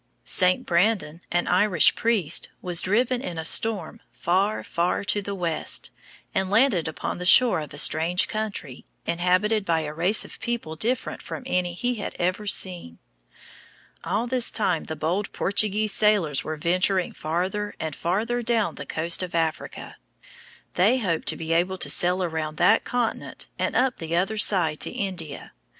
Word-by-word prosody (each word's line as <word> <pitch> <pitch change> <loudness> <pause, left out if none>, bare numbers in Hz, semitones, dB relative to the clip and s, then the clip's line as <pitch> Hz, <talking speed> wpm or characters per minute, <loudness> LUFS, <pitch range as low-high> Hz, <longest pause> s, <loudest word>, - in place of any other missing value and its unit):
St. 185 -1 +2
Brandon, 175 -3 +1
an 175 0 +1
Irish 180 -2 +4
priest, 210 -9 +1
was 180 -2 +1
driven 240 +5 +1
in 175 -9 -6
a 160 - -4
storm 205 -1 +2
far, 195 +5 0
far 175 +3 -1
to 205 0 0
the 200 0 -5
west, 170 -4 -2 0.4
and 190 -1 0
landed 210 - +3
upon 160 - -4
the - - -4
shore 245 -1 +6
of 150 -2 -7
a - - -9
strange 165 +4 +4
country, 205 -11 -5 0.2
inhabited 185 +5 +1
by 165 -3 0
a 150 -1 -5
race 180 +7 +1
of - - -10
people 235 -10 -4
different 235 +10 -2
from - - -7
any 180 -7 -1
he 245 +5 -2
had - - -5
ever 185 +4 -1
seen. 175 - -2 1.1
All 215 +4 -1
this 245 -1 +3
time 185 -7 -1
the 160 - -5
bold 175 +7 -2
Portuguese 210 +1 +1
sailors 200 -10 +2
were 155 0 -5
venturing 180 +3 +1
farther 185 +6 -3
and 160 -3 -4
farther 220 +8 -1
down 225 -7 0
the - - -9
coast 165 +3 +1
of 180 -2 -5
Africa. 165 -1 -3 0.8
They 210 +8 +3
hoped 180 -9 -2
to - - +2
be 165 0 -2
able 180 +3 +1
to - - +1
sail 180 +1 +1
around 160 -3 -3
that 180 +3 +4
continent 245 -2 -3
and - - -1
up 260 -1 +1
the 165 0 -4
other 195 +5 0
side 170 -8 +2
to - - -1
India. 175 -7 -5
185 Hz, 165 wpm, -24 LUFS, 165-210 Hz, 1.1 s, shore